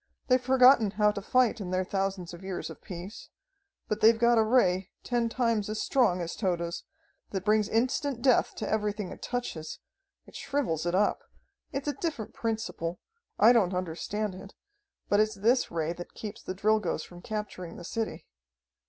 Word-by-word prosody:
They've 255 0 +4
forgotten 255 -3 +6
how 210 +1 +3
to 200 - -5
fight 240 0 +2
in 185 - -4
their 185 0 0
thousands 190 -2 -2
of 170 - -10
years 190 -2 -4
of - - -12
peace. 185 +2 -8 0.6
But 215 0 -2
they've 225 +1 +6
got 235 0 +4
a - - +5
Ray 195 -5 +2
ten 240 -2 0
times 230 -4 0
as 215 0 -3
strong 220 -10 +2
as 170 0 -4
Tode's, 175 -5 -2 0.4
that 190 -1 -4
brings 210 0 +3
instant 250 +2 0
death 255 -3 +3
to - - -4
everything 210 -2 -1
it - - -10
touches. 240 -11 -4 0.5
It - - -16
shrivels 205 - -1
it 175 - +1
up. 205 +2 +2 0.5
It's 275 +1 -4
a 290 - +1
different 300 -11 -4
principle. 220 -7 -3 0.4
I 225 +4 +7
don't 195 -6 +2
understand 185 +4 -3
it, 190 +2 -11 0.5
but 205 - +3
it's 215 0 +2
this 230 +6 +2
Ray 165 0 -1
that 175 0 -10
keeps 210 -2 -7
the 185 - -5
Drilgoes 210 -5 +1
from 175 0 -12
capturing 205 -5 -5
the 175 - -9
city. 225 +4 -4
210 Hz, 175 wpm, -29 LUFS, 185-230 Hz, 0.6 s, I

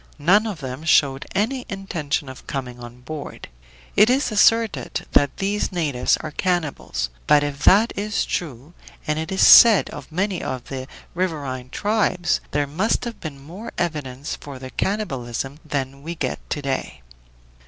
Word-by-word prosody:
None 190 +9 +4
of 190 -8 -5
them 130 +2 -6
showed 140 -4 +3
any 245 +6 0
intention 165 -7 -3
of 130 0 -11
coming 125 -3 -5
on 120 +1 -11
board. 150 +3 -8 0.5
It 210 +3 +6
is 265 0 +2
asserted 225 +1 +2
that 145 -1 +3
these 205 +2 -1
natives 150 -9 +1
are 155 - -6
cannibals; 150 - -2 0.2
but 145 -1 +5
if 145 -1 -3
that 215 +5 +5
is 205 +1 -1
true 145 -1 -4 0.3
and 150 +1 -1
it 160 +2 -4
is 190 - +4
said 230 -4 +8
of - - -9
many 185 +2 -1
of 130 -2 -5
the 130 -1 -5 0.3
riverine 145 -8 -3
tribes 205 -2 0
there 145 0 0
must 185 - 0
have 235 -1 -6
been 145 -4 -7
more 175 +11 -9
evidence 145 -4 -3
for 140 -2 -9
the 130 0 -9
cannibalism 135 - -3
than 140 -3 -4
we 165 +4 -5
get - - -3
to 145 - -3
day. 135 - -3
155 Hz, 160 wpm, -22 LUFS, 135-195 Hz, 0.5 s, said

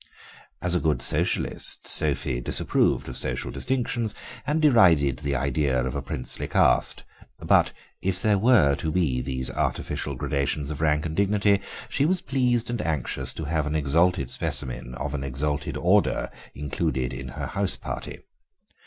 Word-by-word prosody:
As 90 -1 +1
a 90 - +2
good 80 -2 +1
Socialist, - - 0
Sophie - - +1
disapproved - - +2
of 65 - -6
social - - -1
distinctions, 120 -4 -1 0.3
and 150 +2 +1
derided 85 - +5
the 70 -2 -2
idea 70 0 0
of 65 - -3
a 70 - -3
princely 65 -2 -3
caste, 60 - +3 0.3
but - - +3 0.3
if 95 -1 -1
there 105 -1 +2
were 110 - +5
to 80 - -2
be 75 -7 +1
these 65 0 -3
artificial 70 - -2
gradations 70 +1 -1
of 75 - -5
rank 75 -1 +1
and 80 -1 -4
dignity 100 0 +2 0.3
she 140 - +1
was 185 +1 +2
pleased 125 -5 0
and 120 -3 -2
anxious 65 - -2
to 80 - -6
have 80 0 -1
an 75 - -2
exalted 80 0 +2
specimen 60 -1 -3
of 70 +2 -4
an 70 -2 -3
exalted 70 +2 -2
order - - +2 0.2
included 65 -3 -2
in 65 +2 -6
her 65 - -5
house 100 -1 0
party. - - -7
75 Hz, 155 wpm, -25 LUFS, 65-100 Hz, 0.3 s, derided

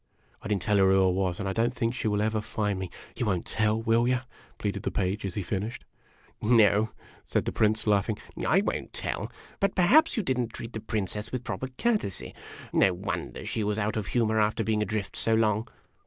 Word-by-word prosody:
I - - -6
did 105 - +2
n't 95 - -3
tell 105 -1 +2
her 95 -1 +5
who 95 0 +5
I 95 - +4
was, 90 -1 -1
and 100 - -2
I 95 - -1
don't 115 +4 +1
think 115 -1 0
she 125 - -2
will 105 0 +1
ever 110 0 0
find 105 -2 -2
me. 95 -1 -4 0.3
You 120 - -1
won't 95 -4 0
tell, 110 0 +1
will 115 +1 +2
you? 125 -1 +2 0.2
" - - -27
pleaded 100 -1 -2
the - - -1
Page, 100 +2 -1
as 90 - -6
he 100 - -2
finished. 105 +6 -4 0.3
" - - -31 0.2
No", 105 0 +5 0.3
said - - -1
the - - -1
Prince, 110 +1 +2
laughing. 105 0 +2 0.2
" - - -3
I - - +5
won't - - -3
tell. - - -2 0.3
But 195 -1 +1
perhaps 265 - +5
you 220 - +1
did 130 -6 0
n't 120 -2 -2
treat 115 +1 -7
the 110 - -3
Princess 105 -1 -2
with 125 -1 -3
proper 130 - -3
courtesy. 220 - -1 0.4
No 95 -2 +4
wonder 95 +3 -4
she 110 - -2
was 105 0 0
out 110 0 0
of 110 -2 -2
humor, 110 -2 +1
after 110 +2 +1
being 110 0 +1
adrift 105 -1 -2
so 115 - +2
long." 110 0 +2
110 Hz, 230 wpm, -28 LUFS, 100-115 Hz, 0.4 s, her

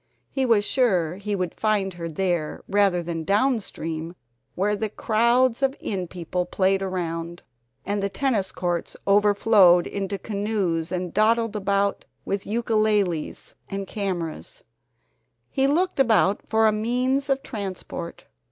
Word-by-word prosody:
He 265 -2 0
was 215 -3 +3
sure 185 - +1
he 205 +1 -3
would 180 -3 -3
find 205 -3 +1
her 170 -1 -5
there 170 -2 -2
rather 195 -3 +2
than 165 -1 -4
down 225 - +2
stream 165 -3 -5 0.4
where 205 +3 +1
the 215 +1 -2
crowds 235 +4 +2
of 270 0 +1
inn 185 -4 -3
people 180 +1 -3
played 190 +1 +1
around, 170 -2 -4 0.4
and 205 +1 -1
the 200 - -1
tennis 215 -5 0
courts 175 -2 -3
overflowed 200 -3 +5
into 200 0 -3
canoes 200 -5 -2
and 180 -1 -3
dawdled 225 +1 +2
about 200 0 0 0.2
with 200 0 -3
ukeleles 215 -6 0 0.2
and 195 0 -4
cameras. 195 - -4 0.9
He 270 -1 +2
looked 345 +3 +1
about 220 -5 +3
for 220 0 +3
a - - +4
means 250 +6 0
of 270 0 +1
transport. 190 -6 -6
200 Hz, 135 wpm, -24 LUFS, 180-225 Hz, 0.9 s, overflowed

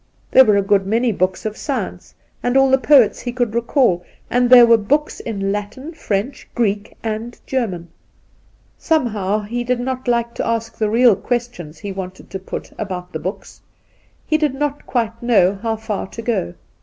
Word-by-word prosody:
There 265 - +8
were 210 -3 +4
a 200 - +2
good 195 -1 +2
many 230 +3 +2
books 185 0 -1
of 215 -1 -3
science, 280 +3 -5 0.3
and 245 +2 +1
all 270 0 +4
the 265 - +5
poets 265 -5 +5
he 245 - -4
could 245 -3 -1
recall; 235 - +2 0.3
and 245 0 +2
there 245 -1 +9
were 235 0 +6
books 280 +8 0
in 225 - -5
Induna 195 0 -1
Nairn 210 +1 -1
91 270 +8 -10
LatiB, - - -23
French, 215 +5 -3
Greek, 210 -3 -1
and 225 +2 -4
German, 195 -10 -2 0.9
Somehow 215 - 0
he 240 +4 -3
did 250 0 0
not 255 +1 -4
like 235 -1 0
to - - -3
ask 230 -1 -2
the 215 -1 +1
real 235 0 +5
questions 230 -10 -4
he 200 +5 -6
wanted 190 -1 -8
to 190 - -4
put 190 - -7
about 185 -4 -5
the - - -3
books. - - -7 0.6
He 310 - +1
did 295 -4 0
not 290 0 -3
quite 230 -2 -2
know 200 -5 +3
how 225 -1 -1
far 215 -3 -4
to 230 - -8
go. 220 - -1
230 Hz, 195 wpm, -19 LUFS, 200-250 Hz, 0.9 s, there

